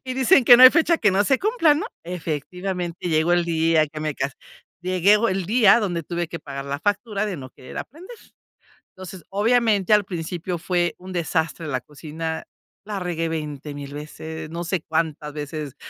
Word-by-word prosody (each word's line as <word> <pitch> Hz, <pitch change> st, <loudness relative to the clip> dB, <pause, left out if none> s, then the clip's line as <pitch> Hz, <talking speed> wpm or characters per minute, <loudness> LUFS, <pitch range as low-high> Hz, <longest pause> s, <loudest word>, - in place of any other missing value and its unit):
Y 255 Hz, -1 st, -4 dB
dicen 265 Hz, +1 st, +4 dB
que: 245 Hz, 0 st, +9 dB
"No 255 Hz, -, +6 dB
hay 255 Hz, -, +12 dB
fecha 335 Hz, 0 st, +3 dB
que 210 Hz, -, +3 dB
no 200 Hz, +2 st, +2 dB
se 265 Hz, +3 st, +2 dB
cumpla", 405 Hz, -8 st, +3 dB
¿no? 305 Hz, -, -2 dB, 0.2 s
Efectivamente, 175 Hz, +2 st, -4 dB
llegó 160 Hz, +2 st, +2 dB
el 175 Hz, -1 st, +3 dB
día 160 Hz, -1 st, +2 dB
que 155 Hz, 0 st, -8 dB
me 155 Hz, -2 st, -2 dB
casé. 135 Hz, 0 st, -3 dB, 0.5 s
Llego 195 Hz, +5 st, +3 dB
el 190 Hz, -2 st, -2 dB
día 230 Hz, 0 st, +5 dB
que 170 Hz, -, -2 dB
tuve 175 Hz, 0 st, -3 dB
que 170 Hz, -, -6 dB
pagar 140 Hz, -2 st, -7 dB
la 140 Hz, +1 st, -3 dB
factura 205 Hz, +1 st, -1 dB
de 190 Hz, -4 st, -4 dB
no 130 Hz, -2 st, -9 dB
querer 130 Hz, -, -13 dB
aprender, 355 Hz, -, -9 dB, 0.8 s
entonces, 185 Hz, -2 st, -10 dB
obviamente, 215 Hz, -1 st, +2 dB
al 210 Hz, -1 st, +4 dB
principio 175 Hz, 0 st, -4 dB
fue 175 Hz, 0 st, -1 dB
un 185 Hz, +1 st, -10 dB
desastre 165 Hz, -1 st, -2 dB
la 130 Hz, -4 st, -2 dB
cocina, 160 Hz, +2 st, -6 dB, 0.4 s
la 210 Hz, -2 st, -4 dB
regué 170 Hz, -2 st, -2 dB
veinte 150 Hz, -2 st, -5 dB
mil 140 Hz, 0 st, -8 dB
veces, 155 Hz, +1 st, -7 dB
no 170 Hz, +2 st, -5 dB
sé 175 Hz, +1 st, -1 dB
cuántas 155 Hz, -2 st, -2 dB
veces 150 Hz, -1 st, -6 dB
175 Hz, 185 wpm, -23 LUFS, 155-205 Hz, 0.8 s, hay